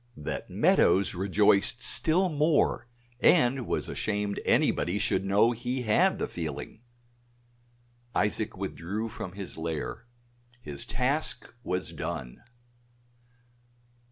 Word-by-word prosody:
That 75 - -5
Meadows 100 +1 +3
rejoiced 100 +4 +2
still 175 +10 +4
more 150 -5 +1 0.3
and 125 0 +3
was - - -1
ashamed 105 -1 -2
anybody 90 +3 +2
should 105 -1 0
know 100 +4 +3
he 125 +2 -3
had 175 - +3
the - - -2
feeling. 80 +5 -6 1.3
Isaac 105 0 0
withdrew 100 +3 -4
from 90 -3 -7
his 100 -4 -7
lair; 80 +7 -4 0.5
his 75 -10 -8
task 135 +3 0
was 90 -3 -3
done. 60 -2 -6
105 Hz, 100 wpm, -28 LUFS, 95-125 Hz, 1.3 s, still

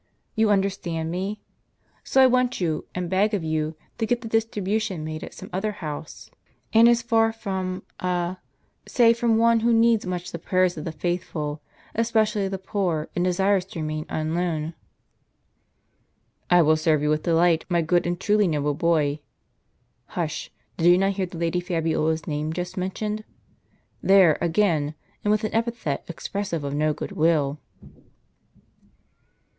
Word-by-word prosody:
You 220 -1 +3
understand 190 -5 0
me? 195 +4 -3 0.6
So 265 - +4
I - - +8
want 255 -1 +2
you, 165 -4 -1
and 180 -1 -2
beg 200 +4 +2
of 190 - -3
you, 155 0 -1 0.2
to 225 - 0
get 245 +1 0
the 230 - -6
distribution 215 -4 -1
made 155 0 -5
at - - -9
some - - -9
other 210 +3 -1
house; 155 -5 -7 0.4
and 230 +1 +7
as 235 0 +3
from 215 -5 0 0.2
a— 180 0 -1 0.5
say 235 -2 +5
from 230 -1 +1
one 230 0 +4
who 235 +1 +2
needs 230 -1 +4
much 180 -1 -4
the 170 - -5
prayers 185 +1 +1
of 150 - -6
the 165 - -3
faithful, 155 -3 -3 0.3
especially 215 -3 +1
the 195 0 -3
poor, 185 -5 -2
and 175 - +1
desires 190 +1 +2
to 190 -3 -8
remain 155 0 -3
unknown." 160 0 -2 0.9
" - - -47 0.7
I 175 -1 +6
will 155 +1 +4
serve 155 -2 +2
you 150 - +1
with 155 0 +1
delight, 170 0 +2
my 170 -2 +2
good 175 +2 +2
and 175 0 -2
truly 210 0 +3
noble 150 -2 0
boy! 150 -2 +1 0.9
Hush! - - -4 0.3
did 165 - +2
you 175 0 +7
not 195 +1 +2
hear 190 -1 -2
the 175 - -9
Lady 170 +1 0
Fabiola's 160 -3 -1
name 150 +1 -2
just 180 +1 -4
mentioned? 210 +3 -3 0.8
There 190 -5 +6
again, 160 -4 +1 0.3
and 210 - 0
with 215 +1 +2
an 215 - -2
epithet 225 - -1
expressive 170 -1 -4
of 140 0 -3
no 155 +1 +1
good - - -5
will." 155 -3 +1
180 Hz, 160 wpm, -24 LUFS, 160-210 Hz, 0.9 s, I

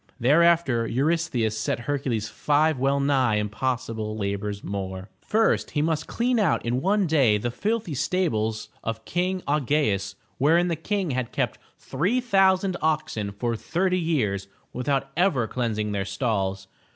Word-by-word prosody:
Thereafter, 145 -3 +3
Eurystheus 130 -5 0
set 115 - -2
Hercules 125 -5 -2
five 150 -1 +1
well 135 +1 +2
nigh 135 -5 +2
impossible 110 0 -2
labors 100 0 -3
more. 95 0 -5
First, 220 +1 +1
he 145 - +3
must 160 -1 -1
clean 240 0 0
out 190 - +1
in 120 +2 0
one 200 +3 +2
day 135 -10 +3
the 120 +3 -2
filthy 215 - -2
stables 115 -9 -1
of 110 0 -4
King 185 +1 -1
Au 150 +2 +2
ge'us 135 -8 0 0.2
wherein 165 +6 +4
the 170 - 0
King 190 +1 -2
had 130 -2 -2
kept - - -2 0.2
three 205 +11 0
thousand 195 -5 +3
oxen 155 -10 -1
for 115 +3 -2
thirty 180 - 0
years 110 - 0 0.3
without 135 +1 -1
ever 165 -9 +2
cleansing 110 -3 -2
their 100 -1 -1
stalls. 95 -2 -2
135 Hz, 145 wpm, -25 LUFS, 110-170 Hz, 0.3 s, wherein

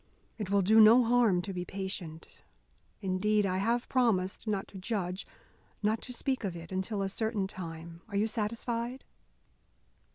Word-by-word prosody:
It 205 -3 -3
will 200 0 +3
do 220 +4 +6
no 230 +4 +8
harm 230 -6 +3
to 195 - -5
be 180 -1 -3
patient. 190 -4 -5 0.8
Indeed, 205 +3 +2
I 185 -1 0
have 235 +4 0
promised 220 -6 +1
not 200 -2 -1
to 195 - -9
judge, 185 -2 -3 0.6
not 215 +2 +1
to - - -7
speak 260 +1 -2
of 190 -4 -2
it, 165 +1 -9
until 195 +2 -2
a - - 0
certain 215 0 -1
time. 165 -2 -7
Are 200 - -6
you 205 +2 +3
satisfied?" 230 +3 -3
200 Hz, 160 wpm, -31 LUFS, 185-225 Hz, 0.8 s, no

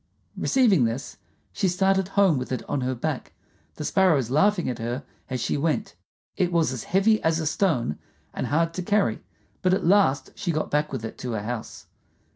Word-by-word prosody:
Receiving 220 - +3
this, 115 +5 -4 0.4
she 195 - 0
started 190 +1 +2
home 190 -9 +5
with 125 - -6
it 130 - -3
on 140 - -1
her 130 +1 -1
back, 120 - -4 0.4
the 150 - -5
sparrows 155 - +2
laughing 195 +5 +3
at 125 -2 -3
her 120 +4 -3 0.3
as 130 -1 -2
she 120 - -1
went. 165 +9 -1 0.4
It 180 -1 +1
was 165 -6 +2
as 125 - -6
heavy 205 +4 +3
as 160 0 +1
a 160 - -2
stone, 155 - 0 0.3
and - - -3
hard 165 +3 +1
to 185 - -3
carry, 205 +3 +1 0.4
but 185 -1 +3
at 195 - -3
last 180 -7 +3
she 200 -4 -2
got 155 -1 -2
back 150 +1 +1
with 130 -4 -4
it 110 - -8
to 125 -2 -4
her 105 -2 -3
house. 115 0 -6
160 Hz, 195 wpm, -25 LUFS, 130-190 Hz, 0.4 s, home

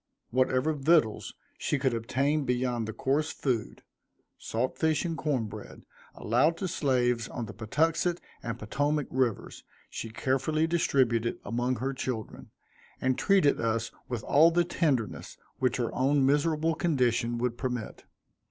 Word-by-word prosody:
Whatever 130 +4 +2
victuals 150 -5 +2 0.2
she 145 - 0
could 130 -2 +1
obtain 140 +6 0
beyond 125 -3 -1
the - - -3
coarse 140 +7 0
food, 120 -6 -2 0.5
salt 120 +3 -2
fish 160 0 +1
and 165 -1 -2
corn 145 -7 -1
bread, 105 0 -10 0.3
allowed 135 +9 +2
to 190 - -2
slaves 125 -8 +1
on 120 - -5
the 105 - -9
Patuxent 160 +10 0 0.2
and 115 -1 -4
Potomac 145 +7 -1
rivers, 125 -5 -1 0.3
she 115 - -5
carefully 135 +7 0
distributed 130 -8 +1
among 120 +4 0
her 130 +3 -2
children, 125 -4 -5 0.5
and 130 0 +1
treated 190 -5 +3
us 115 0 -1 0.2
with 120 -4 -3
all 155 +4 +6
the 175 +1 +2
tenderness 140 - -1 0.2
which 130 - +1
her 120 -2 -2
own 135 +1 +2
miserable 155 +3 +2
condition 125 -7 +1
would 120 0 -1
permit. 125 -3 -4
130 Hz, 140 wpm, -29 LUFS, 120-150 Hz, 0.5 s, all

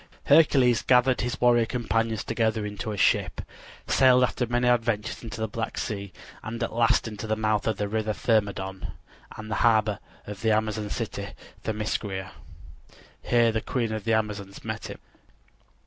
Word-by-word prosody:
Hercules 130 -7 +5
gathered 125 0 +3
his 125 +2 -3
warrior 120 -2 +4
companions 115 -2 -1
together 110 -2 0
into 105 +1 -5
a 105 - -5
ship, - - +2 0.5
sailed 130 -1 +5
after 125 0 0
many 120 +1 +1
adventures 115 -3 0
into 115 -2 -7
the 110 - -1
Black 115 +1 -4
Sea 100 -5 -4 0.3
and 115 +1 -5
at - - -3
last 120 +1 +2
into 110 0 -6
the 110 - +1
mouth 110 -1 0
of 110 -3 0
the 105 - -1
river 110 +1 -1
Thermodon, 100 -4 -1 0.4
and 110 0 -8
the - - -1
harbor 110 -3 +3 0.3
of 105 -1 -8
the 110 - +1
Amazon 110 -1 0
city - - -4 0.4
Themiscira. 105 -3 -3 0.9
Here 120 -1 +3
the 110 0 -1
queen 115 -3 -2
of 110 -2 -3
the 115 - +2
Amazons 105 -3 -3
met - - -4
him. - - -8
110 Hz, 165 wpm, -26 LUFS, 105-120 Hz, 0.9 s, Hercules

